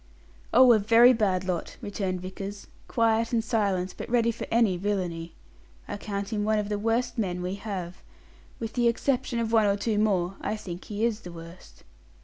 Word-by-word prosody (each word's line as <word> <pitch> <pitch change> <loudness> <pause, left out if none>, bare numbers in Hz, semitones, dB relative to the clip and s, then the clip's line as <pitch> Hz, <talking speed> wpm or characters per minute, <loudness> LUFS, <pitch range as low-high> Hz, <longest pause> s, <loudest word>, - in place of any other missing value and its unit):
"Oh, 250 0 +7
a 220 - +4
very 230 +4 +6
bad 195 -5 +1
lot," 180 -3 -3
returned 190 -3 -3
Vickers; 195 +2 -7 0.2
"quiet 230 0 +1
and 230 -2 +1
silent, 200 -5 0
but - - -6
ready 235 -1 +3
for 230 - -7
any 225 -5 +3
villainy. 175 -3 -3 0.5
I 205 - -4
count 200 +1 -4
him 210 -1 0
one 215 +1 +2
of 210 -1 -2
the 205 -1 -1
worst 230 +3 0
men 180 -4 -2
we 180 +1 -2
have. 195 -3 -5 0.6
With 225 -1 -5
the 240 -1 +2
exception 240 0 0
of 230 -1 -1
one 220 -2 +5
or 200 0 +2
two 210 0 0
more, 195 -3 +1
I - - -2
think 180 -4 -8
he 210 +2 -1
is 225 -2 0
the 180 -5 -10
worst." 170 +1 -12
205 Hz, 190 wpm, -27 LUFS, 185-230 Hz, 0.6 s, Oh